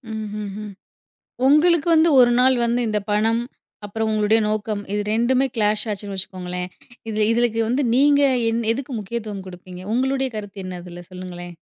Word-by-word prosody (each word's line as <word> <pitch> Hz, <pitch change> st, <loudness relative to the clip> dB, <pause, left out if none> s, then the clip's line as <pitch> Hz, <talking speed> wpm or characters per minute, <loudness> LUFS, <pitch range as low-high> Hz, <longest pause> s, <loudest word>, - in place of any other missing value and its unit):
ம்ஹ்ஹ்ம். 210 Hz, -1 st, -6 dB, 0.8 s
உங்களுக்கு 320 Hz, +3 st, +4 dB
வந்து 320 Hz, +1 st, +5 dB
1 240 Hz, -1 st, +6 dB
நாள் 260 Hz, +1 st, +5 dB
வந்து 240 Hz, +1 st, 0 dB
இந்த 210 Hz, -1 st, 0 dB
பணம், 225 Hz, +2 st, +2 dB, 0.4 s
அப்புறம் 220 Hz, +2 st, -2 dB
உங்களுடைய 215 Hz, +1 st, +3 dB
நோக்கம் 215 Hz, -1 st, -2 dB
இது 210 Hz, -, 0 dB
2டுமே 255 Hz, +4 st, +2 dB
கிளாஷ் 210 Hz, 0 st, +1 dB
ஆச்சுன்னு 200 Hz, -1 st, -5 dB
வச்சுக்கோங்களேன். 180 Hz, -1 st, -4 dB, 0.4 s
இதில 215 Hz, -1 st, +1 dB
இதுக்கு 230 Hz, -1 st, +1 dB
வந்து, 260 Hz, +4 st, +1 dB
நீங்க 285 Hz, +2 st, +4 dB, 0.3 s
எ -, -, 0 dB, 0.2 s
எதுக்கு 270 Hz, +3 st, -6 dB
முக்கியத்துவம் 210 Hz, -2 st, -5 dB
குடுப்பீங்க? 180 Hz, 0 st, -10 dB
உங்களுடைய 265 Hz, +1 st, 0 dB
கருத்து 200 Hz, -2 st, -7 dB
என்ன? 180 Hz, -1 st, -6 dB
அதில 175 Hz, 0 st, -10 dB
சொல்லுங்களேன். 175 Hz, -1 st, -8 dB
215 Hz, 150 wpm, -22 LUFS, 195-245 Hz, 0.8 s, 1